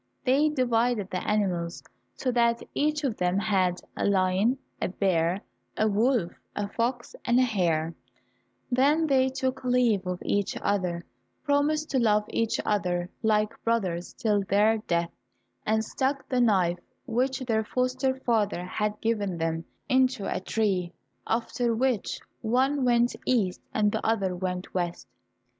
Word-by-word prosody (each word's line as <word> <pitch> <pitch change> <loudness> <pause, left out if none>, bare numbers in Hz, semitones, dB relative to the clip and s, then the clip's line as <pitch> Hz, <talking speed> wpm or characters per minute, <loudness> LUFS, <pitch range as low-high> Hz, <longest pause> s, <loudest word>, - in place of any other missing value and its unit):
They 280 +4 +4
divided 240 -6 +1
the 185 - -2
animals, 180 -5 -1 0.3
so 255 - -1
that 235 -1 +2
each 300 +1 0
of 255 -6 -1
them 180 +1 +1
had 190 -4 +1 0.2
a - - -2
lion, 195 +5 +2 0.2
a - - +1
bear, 180 -1 +1 0.4
a 215 - +3
wolf, 215 -3 +2 0.2
a 205 - -2
fox, 240 +3 -2
and 240 0 +2
a - - +5
hare, 170 -8 0 0.8
then 285 +6 +3
they 265 -3 +3
took 260 0 -2
leave 245 -7 +2
of 180 0 -2
each 200 -1 0
other, 180 -4 -1 0.4
promised 295 +2 +1
to 265 - +2
love 210 -3 +3
each 230 -1 0
other 180 -3 0
like 215 -1 +1
brothers 185 -7 -1
till 210 -3 +1
their 210 +3 +3
death, 170 -4 -1 0.6
and 220 +1 +2
stuck 270 +4 -1
the 255 -1 +1
knife 185 -6 +3 0.3
which 255 +2 0
their 225 -3 0
foster 255 +3 0
father 210 -7 0
had 210 +3 -2
given 205 -5 0
them, 165 0 -2 0.2
into 260 -5 +2
a - - -1
tree, 185 -3 -1 0.3
after 235 +1 0
which 250 -3 0 0.2
one 260 +5 +1
went 240 -1 +3
east, 210 -8 +1
and 210 -1 +2
the - - -2
other 195 -5 +1
went 180 0 -4
west. 175 -2 -3
220 Hz, 145 wpm, -27 LUFS, 185-250 Hz, 0.8 s, a